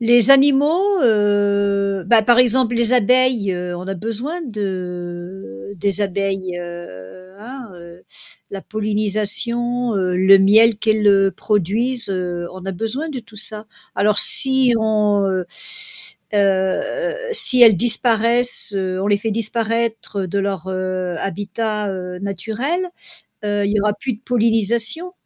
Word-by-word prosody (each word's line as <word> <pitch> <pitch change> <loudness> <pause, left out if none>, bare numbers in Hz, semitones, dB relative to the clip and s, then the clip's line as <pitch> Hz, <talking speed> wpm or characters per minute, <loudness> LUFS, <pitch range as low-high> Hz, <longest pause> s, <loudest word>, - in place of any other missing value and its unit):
Les 240 +1 +5
animaux, 295 +8 +3
heu, 200 -3 0
bah, 230 +1 +4
par 240 +3 +2
exemple 250 -1 +2
les 235 +1 +2
abeilles 245 -4 +1 0.2
on 180 +1 -9
a 195 - -3
besoin 235 - -6
de 180 - -7
des 200 +2 +1
abeilles, 195 -2 -3
heu, 175 - -11
hein, 245 0 -11
heu 170 0 -14 0.5
la 195 -1 -7
pollinisation, 215 +3 -2
heu, 185 -2 -1
le 190 +2 +5
miel 215 +3 +4
qu'elles, 215 0 0
heu, 195 -1 +3
produisent, 220 +4 -2
heu, 175 -2 -4
on 185 0 -11
a 195 - -4
besoin 230 - -5
de 270 -4 -6
tout 220 -2 -19
ça. 215 0 +4 0.3
Alors 210 0 +1
si 265 -2 +4
on, 210 -2 0
heu 185 -2 -3 0.9
heu 200 - -1 0.2
si 255 - +6
elles 220 -4 +7
disparaissent, 235 -1 +3
heu, 185 -1 -3
on 195 - -3
les 205 0 +2
fait 220 +2 -4
disparaître 225 -2 -3
de 200 +3 -3
leur, 195 -3 -4
heu, 185 -2 -4
habitat, 205 +2 -4
heu, 180 -1 -7
naturel, 225 - -4 0.6
heu, 205 -1 -1
il 205 - -2
y 210 - 0
aura 210 0 0
plus 250 +3 -5
de 215 - -18
pollinisation 235 - +1
210 Hz, 140 wpm, -18 LUFS, 190-235 Hz, 0.9 s, elles